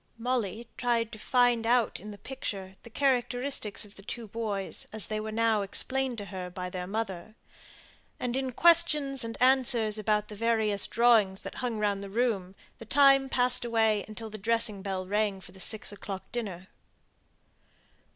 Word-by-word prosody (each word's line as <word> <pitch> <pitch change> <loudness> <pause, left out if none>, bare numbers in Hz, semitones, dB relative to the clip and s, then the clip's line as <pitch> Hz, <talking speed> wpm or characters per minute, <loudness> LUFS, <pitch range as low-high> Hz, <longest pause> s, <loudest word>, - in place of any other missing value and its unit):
Molly 235 -2 -2
tried 235 -2 0
to 220 - -9
find 245 -1 +2
out 240 -1 +2
in 210 - -9
the 205 - -9
picture 200 -5 -6
the 235 - -13
characteristics 245 -4 -1
of 205 - -17
the - - -9
two 230 +3 -6
boys, 205 -3 -4
as 215 -4 +2
they 215 0 -3
were 215 0 -5
now 225 -1 +2
explained 260 +5 +1
to 205 - -5
her 185 -2 -6
by 180 0 -6
their 180 -1 -5
mother; 210 -1 -4 0.8
and 245 0 -2
in 265 -1 -1
questions 300 -4 +4
and 230 0 -5
answers 245 -4 +3
about 210 0 0
the 210 - -9
various 220 -2 0
drawings 225 -5 +3
hung 245 -3 -2
round 205 -2 0
the 200 - -7
room 200 -4 -1 0.2
the 230 - -9
time 275 +2 +5
passed 250 -1 +3
away 220 -3 +2
until 220 +1 -7
the 215 - -7
dressing 225 -1 +2
bell 190 -1 -3
rang 205 0 0
for 190 - -13
the 190 - -14
six 215 +3 +1
o'clock 200 -1 -8
dinner. 190 -6 -5
220 Hz, 170 wpm, -29 LUFS, 200-245 Hz, 0.8 s, time